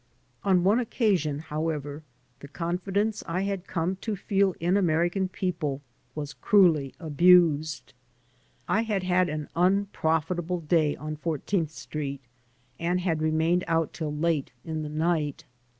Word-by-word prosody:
On 185 -3 +3
one 205 +6 +4
occasion, 200 - +1
however, 150 -1 -3 0.4
the 140 - -10
confidence 190 +7 -1
I 175 +3 -1
had 195 -2 -3
come 180 +2 -1
to 215 +2 -3
fed 195 -1 +1
in 175 +2 +1
Amoican 180 0 +1
people 165 -8 -2 0.4
was 145 -1 -5
cruelly 165 -10 +3
abused. 155 -4 +3 0.7
I 220 - +2
had 210 -4 -1
had 180 -1 +2
an 150 -1 -4
u]q>rofitahle 175 -2 0
day 155 -3 +3
on 155 +1 -6
Fourteenth 165 +2 -1
Street 145 -3 -5 0.6
and 175 +2 0
had 165 -4 0
ronained 160 +3 +2
out 165 -1 0
till 155 -3 -3
late 150 -1 0
in 160 -1 -3
the 150 - -5
nj^t. 155 -2 -1
170 Hz, 135 wpm, -27 LUFS, 155-185 Hz, 0.7 s, one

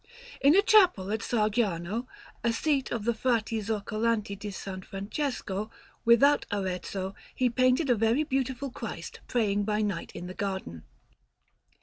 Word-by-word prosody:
In 280 +4 +6
a 400 - +6
chapel 360 - +5
at 220 - 0
Sargiano, 215 -1 0 0.4
a 235 - +3
seat 275 +3 0
of 225 -3 -2
the 235 - +2
Frati 225 -2 0
Zoccolanti 215 0 -1
di 205 +1 -7
S. 200 - -8 0.2
Francesco, 210 0 -3 0.4
without 255 +5 +5
Arezzo, 190 -1 -3 0.2
he 250 -2 +2
painted 255 +5 +3
a 250 - +5
very 225 +6 +2
beautiful 265 -2 -2
Christ - - -7
praying 205 -4 +1
by 210 +1 0
night 200 -5 -3
in 175 - -6
the 180 - -6
Garden. 190 - -4
220 Hz, 140 wpm, -28 LUFS, 200-255 Hz, 0.4 s, In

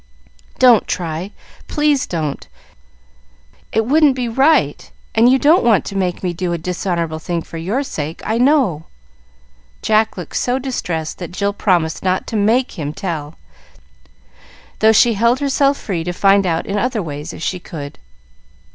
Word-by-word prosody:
"Don't 245 -5 +5
try; 170 +1 -3 0.4
please 295 -3 +1
don't! 155 -5 -4 1.2
It 225 0 +1
wouldn't 290 +1 +4
be 250 -2 -2
right, 265 - +2 0.2
and 230 +3 +5
you 265 - +5
don't 305 +6 +4
want 225 -4 +3
to 200 - -6
make 185 -2 -2
me 180 -1 -1
do 175 0 -2
a - - -1
dishonorable 170 -2 -3
thing 170 0 -3
for 165 - -8
your 210 +12 -1
sake, 160 - -5
I 220 +2 0
know." 250 - +2 1.0
Jack 220 0 +2
looked 175 -4 -5
so 250 +1 0
distressed 180 - -4
that 175 -2 -6
Jill 200 +2 -1
promised 175 -6 0
not 185 0 0
to - - -1
make 220 +1 +1
him 150 -1 -3
tell, 155 -5 -5 1.4
though 220 0 +5
she 230 +2 +4
held 235 +4 +2
herself 280 0 +2
free 175 -6 -3
to 175 - -2
find 195 +1 +3
out 165 -1 -1
in 205 +1 -2
other 235 -3 -1
ways, 150 +1 -6
if - - -9
she 180 - -2
could. 145 -5 -8
195 Hz, 160 wpm, -18 LUFS, 170-245 Hz, 1.4 s, Don't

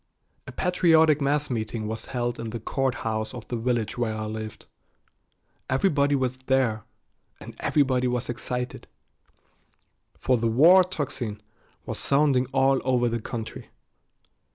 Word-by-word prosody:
A - - -6
patriotic 160 -4 +3
mass 145 0 0
meeting 110 -1 -3
was 110 +1 -5
held 120 -2 -3
in 115 - -4
the 115 +1 -5
court 130 +3 -1
house 110 +1 -2
of 120 - -9
the 120 - -2
village 120 -1 -1
where 110 -2 -1
I 110 0 -4
lived. 110 0 -6 1.0
Everybody 145 0 +2
was 130 -1 -1
there, 130 -4 0 0.5
and - - -11
everybody 130 -4 +2
was 125 0 -1
excited, 125 +1 -4 1.3
for 130 -1 +1
the 115 0 0
war 165 +11 +7
tocsin 135 - -4 0.5
was - - -4
sounding 140 -3 +2
all 135 0 +2
over 125 -2 +2
the 115 0 -2
country. 110 -1 -6
125 Hz, 135 wpm, -25 LUFS, 115-140 Hz, 1.3 s, war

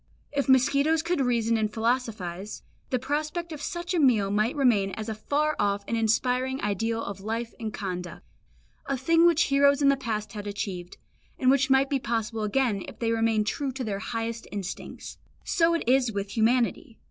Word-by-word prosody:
If 280 -1 -1
mosquitoes 280 +5 +4
could 340 -3 0
reason 230 -3 +1
and 215 -1 0
philosophise, 215 -5 -2 0.3
the 255 - +1
prospect 305 +6 -3
of 300 -2 -7
such 345 +3 -4
a 350 - +2
meal 225 -9 +3
might 215 +7 +1
remain 235 -9 +3
as 220 0 -5
a - - -1
far 295 +8 0
off 200 0 +1
and 230 - -1
inspiring 250 +4 +1
ideal 225 +3 -1
of 200 -1 -6
life 225 +3 -3
and 220 -2 -4
conduct, 180 -4 -6 0.6
a 275 - -1
thing 330 +6 +4
which 335 -2 +4
heroes 280 0 +5
in 280 -1 +4
the 275 - +4
past 220 -5 -4
had 205 -1 -6
achieved, 190 -3 -5 0.4
and 255 0 +4
which 275 0 +2
might 265 +1 +4
be 275 -1 0
possible 225 -2 -2
again 215 -1 +1
if - - -10
they 230 -1 -1
remained 225 -2 +2
true 270 +5 -2
to 260 0 -4
their 205 -4 -3
highest 230 +2 -4
instincts. 200 -3 -6 0.2
So 335 0 +2
it 335 - -3
is 255 -2 +3
with 200 -1 -4
humanity. 230 0 +1
235 Hz, 185 wpm, -27 LUFS, 215-275 Hz, 0.6 s, heroes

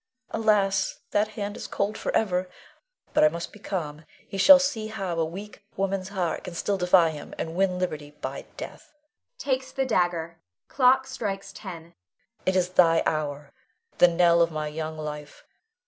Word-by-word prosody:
Alas, 210 -3 +1
that 210 +1 +2
hand 205 -2 -5
is - - -6
cold 205 +2 -1
forever! 185 -5 0 0.6
But - - +4
I 155 - +7
must 170 +2 -6
be 210 - -13
calm. 160 -7 -4 0.2
He - - -8
shall 285 +8 +10
see 270 -6 -1
how 195 -6 -3
a - - +3
weak 195 +6 -7
woman's 195 -1 -1
heart 185 -4 -2
can 180 -2 -7
still 200 +3 -1
defy 180 -2 +5
him, 150 - -9
and 160 - -4
win 185 0 +1
liberty 155 -5 -3
by - - -5
death - - -9 0.4
[takes 265 - -2
the 270 -1 -1
dagger; 175 -7 0 0.3
clock 265 0 +4
strikes 200 -5 -4
ten]. 170 -4 -9 0.5
It 185 - +3
is 180 -1 +2
the 165 -3 +4
hour, 145 -2 -3 0.5
the 180 - +9
knell 170 0 +4
of 165 - +4
my 155 -1 -3
young 155 +1 -5
life. 150 -1 -7
180 Hz, 165 wpm, -26 LUFS, 165-205 Hz, 0.6 s, shall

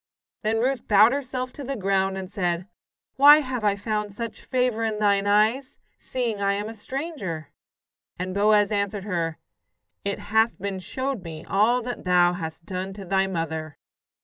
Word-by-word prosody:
Then 220 +1 0
Ruth 255 +3 0
bowed 210 +2 +6
herself 255 -2 -3
to 285 - -8
the 275 +1 -3
ground, 195 -2 0
and 190 0 -6
said: 180 -3 -1 0.5
"Why 290 +2 +9
have 255 -4 -4
I 205 -1 +3
found 210 0 -3
such 230 0 -6
favour 250 -3 0
in 220 -1 -1
thine 200 -1 +2
eyes, 220 +6 +2 0.2
seeing 235 -5 -3
I 200 0 +2
am 205 +1 -3
a 225 - -6
stranger?" 215 - -5 0.7
And 185 +1 -4
Boaz 205 0 +4
answered 200 -1 -1
her: 170 -5 -2 0.7
"It 200 0 -2
hath 220 +2 +1
been 195 0 -3
showed 260 +2 -3
me 160 -2 -8
all 230 +5 +2
that 245 +1 -5
thou 180 -1 +4
hast 160 -1 -6
done 185 +1 -4
to 195 0 -9
thy 195 +1 +1
mother." 160 -4 -4
205 Hz, 170 wpm, -25 LUFS, 190-235 Hz, 0.7 s, Why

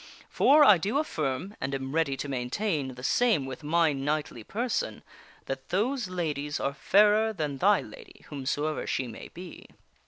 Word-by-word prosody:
For 295 +2 +6
I 205 -10 +7
do 205 - -1
affirm, 160 - -2
and 135 +1 -2
am 135 0 -5
ready 155 -4 +1
to 145 - -4
maintain 135 - -2
the 125 - -11
same 220 - +2
with 130 +1 -7
my 160 0 +2
knightly 140 -3 -2
per 235 - -3
son, 110 - -2 0.4
that 135 0 -6
those 235 +4 0
ladies 150 -5 -3
are 140 - -1
fairer 210 +7 +4
than 150 -7 -3
thy 205 +5 +4
lady, 435 -7 -13
whomsoever 145 +2 -2
she 130 - -1
may 115 - -9
be." 180 -1 -11
155 Hz, 165 wpm, -28 LUFS, 135-205 Hz, 0.4 s, I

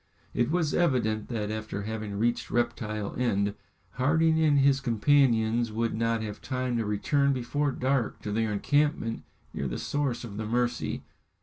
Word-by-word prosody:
It 120 0 +1
was 160 -2 +1
evident 120 -10 +1
that 105 -3 -3
after 110 -1 -4
having 110 -1 -4
reached 120 +3 0
Reptile 110 -3 -1
End, 100 -5 +1 0.5
Harding 160 +4 +3
and 150 -3 +4
his 135 0 +4
companions 115 -2 +3
would 115 +1 -1
not 115 0 0
have 105 -1 -6
time 130 -1 -2
to 115 - -1
return 140 +7 +2
before 140 +3 -1
dark 130 -2 0
to 105 - -3
their 110 +1 0
encampment 145 +1 +1 0.3
near 70 - -2
the - - -3
source 140 -5 -2
of 105 -4 -7
the 110 - -3
Mercy. 120 +2 -1
120 Hz, 160 wpm, -28 LUFS, 110-140 Hz, 0.5 s, and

